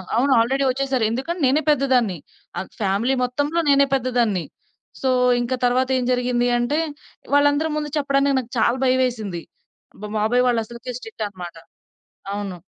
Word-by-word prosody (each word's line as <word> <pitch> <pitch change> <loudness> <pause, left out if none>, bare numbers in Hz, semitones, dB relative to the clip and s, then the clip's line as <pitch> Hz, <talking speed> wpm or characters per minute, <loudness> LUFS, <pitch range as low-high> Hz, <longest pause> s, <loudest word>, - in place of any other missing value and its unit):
అవును. 270 +4 +2
ఆల్రెడీ 265 +4 +1
ఒచ్చేసారు, 265 -2 -1
ఎందుకంటే 320 +8 -3
నేనే 280 +4 +3
పెద్దదాన్ని. 255 - +2 0.4
ఆహ్, 190 - -4
ఫ్యామిలీ 205 +7 +1
మొత్తంలో 290 +6 -1
నేనే 280 0 +5
పెద్దదాన్ని. 240 -8 +1 0.6
సో, 265 - +1 0.3
ఇంక 240 +2 -2
తరవాతేం 255 +1 +2
జరిగింది 245 -1 +1
అంటే 240 +6 0 0.6
వాళ్ళందరి 290 +2 +3
ముందు 300 -1 -3
చెప్పడానికి 275 -1 +1
నాకు 245 -1 -8
చాలా 235 +3 +2
భయవేసింది. 245 -9 0 0.6
మా - - -4
బాబాయ్ 245 +4 +2
వాళ్ళసలకే 235 +1 -2
స్ట్రిక్ట్ 225 -1 -7
అనమాట. 175 -4 -9 0.8
అవును. 200 -3 -4
250 Hz, 130 wpm, -22 LUFS, 225-275 Hz, 0.8 s, నేనే